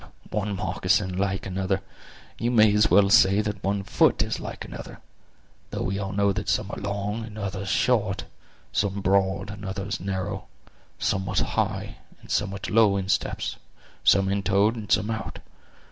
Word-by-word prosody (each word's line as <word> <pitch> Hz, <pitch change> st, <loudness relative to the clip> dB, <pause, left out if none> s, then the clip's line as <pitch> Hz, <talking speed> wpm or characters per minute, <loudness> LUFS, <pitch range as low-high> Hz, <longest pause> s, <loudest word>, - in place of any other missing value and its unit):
"One 105 Hz, -1 st, -1 dB
moccasin 95 Hz, 0 st, 0 dB
like 95 Hz, 0 st, -1 dB
another! 95 Hz, 0 st, -1 dB, 0.6 s
you 120 Hz, -, 0 dB
may 110 Hz, -3 st, +5 dB
as 105 Hz, 0 st, +4 dB
well 100 Hz, +2 st, +5 dB
say 100 Hz, -3 st, +6 dB
that 105 Hz, -2 st, -4 dB
one 100 Hz, 0 st, 0 dB
foot 95 Hz, -, +3 dB
is -, -, -3 dB
like -, -, -6 dB
another; -, -, -9 dB, 0.7 s
though -, -, -3 dB
we 95 Hz, +1 st, -2 dB
all 100 Hz, 0 st, -3 dB
know 100 Hz, 0 st, +2 dB
that 105 Hz, +1 st, -3 dB
some 100 Hz, -, 0 dB
are -, -, -6 dB
long, 100 Hz, +2 st, -3 dB
and 110 Hz, -1 st, -9 dB
others 100 Hz, -1 st, -4 dB
short; -, -, +1 dB, 0.5 s
some 100 Hz, 0 st, 0 dB
broad 95 Hz, +1 st, +1 dB
and 100 Hz, 0 st, -9 dB
others 100 Hz, +2 st, -3 dB
narrow; 95 Hz, +1 st, -3 dB, 0.5 s
some 95 Hz, -1 st, -1 dB
with -, -, +1 dB
high, -, -, -2 dB, 0.2 s
and -, -, -12 dB
some 105 Hz, -, +1 dB
with 95 Hz, -1 st, -5 dB
low 105 Hz, -2 st, +5 dB
insteps; 95 Hz, -1 st, -1 dB, 0.5 s
some 95 Hz, -1 st, +5 dB
intoed, 100 Hz, +2 st, +2 dB
and 110 Hz, -3 st, -7 dB
some 105 Hz, -, +3 dB
out. 110 Hz, -, -4 dB
100 Hz, 165 wpm, -25 LUFS, 95-105 Hz, 0.7 s, say